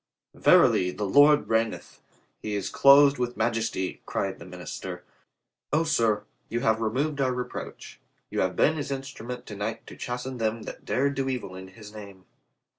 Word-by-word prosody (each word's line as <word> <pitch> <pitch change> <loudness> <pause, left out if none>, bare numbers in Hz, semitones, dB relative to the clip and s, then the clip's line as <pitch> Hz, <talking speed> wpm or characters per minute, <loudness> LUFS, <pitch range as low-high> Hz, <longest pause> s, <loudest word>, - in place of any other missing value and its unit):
"Verily, 90 - +5
the 105 +3 -4
Lord 145 +8 +5
reigneth. 115 0 -1 0.4
He 105 -1 -3
is 100 - -3
clothed 140 0 +6
with 125 0 -2
majesty," 110 -4 -1
cried 95 -1 -2
the 85 - -11
minister. 90 -3 -7 0.7
"O, 155 +3 +3
sir, 115 -9 +1 0.3
you 120 +1 -2
have 110 -1 +2
re 110 - +1
moved 140 +5 -1
our 130 -1 +2
reproach. 125 0 -7 0.3
You - - -2
have 95 0 0
been 155 +1 +3
His 145 -1 -4
instru 135 -4 -6
ment 125 0 -6
to 105 - -8
night 110 +3 -4
to - - -11
chasten 125 +1 -5
them 110 0 -1
that - - -9
dared 140 +2 +1
do 135 0 -2
evil 120 -8 -4
in 95 0 -9
His 105 +2 -13
name." 100 -3 -11
115 Hz, 180 wpm, -26 LUFS, 105-135 Hz, 0.7 s, clothed